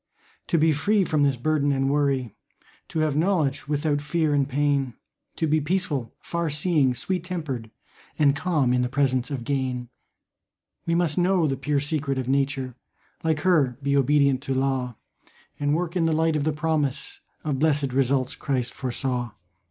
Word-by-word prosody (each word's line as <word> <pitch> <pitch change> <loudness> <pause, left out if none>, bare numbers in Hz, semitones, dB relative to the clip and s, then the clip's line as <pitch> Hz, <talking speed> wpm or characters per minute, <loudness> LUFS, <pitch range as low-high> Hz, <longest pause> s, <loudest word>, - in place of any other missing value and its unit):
To 170 - +2
be 160 0 +4
free 200 +8 +2
from 155 -4 0
this 140 -2 +3
burden 145 +2 +1
and 135 -1 +1
worry, 140 -5 +1 0.5
To 160 - -2
have 155 -2 +1
knowledge 155 -5 +1
without 145 0 0
fear 155 0 0
and 140 -1 +1
pain, 140 -3 0 0.4
To - - 0
be 155 0 +2
peaceful, 150 -7 -1
far 170 -1 -2
seeing, 150 -4 +2
sweet 180 +7 -2
tempered, 155 -11 -4 0.5
And 145 -2 +4
calm 145 -6 +1
in 125 - +2
the 125 - 0
presence 130 -1 +1
of 135 -5 -4
gain, 130 -2 -2 1.0
We 165 - +2
must 170 -2 +1
know 180 -1 +3
the 135 -3 0
pure 140 +2 0
secret 145 -1 -1
of 130 -2 -2
Nature, 135 -1 0 0.5
Like 160 -2 +1
her 150 -9 +3
be 140 0 +1
obedient 140 -1 +3
to 135 -1 -2
law, 130 -3 -1 0.6
And 145 +1 +1
work 175 +1 -2
in 170 -2 +2
the 165 - +2
light 160 0 +2
of 150 -1 0
the 155 - +2
promise 150 -2 -1 0.2
Of 145 -4 -1
blessed 145 -4 +1
results 130 -1 +1
Christ 130 -4 -2
foresaw. 125 -2 -2
145 Hz, 170 wpm, -25 LUFS, 135-155 Hz, 1.0 s, be